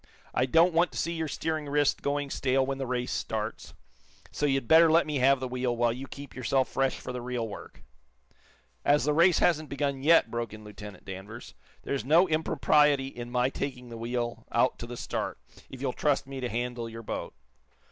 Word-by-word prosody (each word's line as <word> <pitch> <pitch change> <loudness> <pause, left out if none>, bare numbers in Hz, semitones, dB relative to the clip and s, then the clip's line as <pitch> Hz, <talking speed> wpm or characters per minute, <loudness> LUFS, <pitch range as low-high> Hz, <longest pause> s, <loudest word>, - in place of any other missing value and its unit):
I 130 - +1
don't 165 +6 +4
want 170 +2 +3
to - - -6
see 170 - -1
your 160 -1 -2
steering 155 0 -3
wrist 145 0 +2
going 140 -1 -1
stale 130 0 +1
when 135 0 -3
the 135 - -3
race 125 0 -2
starts, - - -4 0.6
so 150 - 0
you'd 135 -3 0
better 160 0 +7
let 165 +1 +5
me 150 -2 -2
have 135 +1 +4
the 130 - -3
wheel, 125 -1 -2
while 120 -1 +2
you 130 +3 -7
keep 140 0 -10
yourself 130 +1 +1
fresh 135 -1 0
for 125 - -6
the 125 - -4
real 120 -2 -3
work." 105 - -10 1.0
"As 145 +1 +3
the 150 - +2
race 170 +3 +5
hasn't 155 -3 +2
begun 140 -1 -2
yet," 155 -5 +5
broke 115 -2 -3
in 110 - -12
Lieutenant 105 -2 -11
Danvers, 100 +5 -9 0.3
"there - - -3
is 135 - -1
no 165 +8 +5
impropriety 150 -3 +3
in 120 -2 -8
my 125 +1 +1
taking 130 -4 -5
the 115 - -8
wheel 120 0 -3
out 120 +2 +2
to 120 - -6
the 120 0 -7
start, - - -3 0.3
if 130 - -10
you'll 130 -2 -1
trust 145 -2 +1
me 135 0 -7
to 125 -1 -3
handle 120 0 -3
your 115 0 -9
boat." - - -5
130 Hz, 210 wpm, -28 LUFS, 120-145 Hz, 1.0 s, better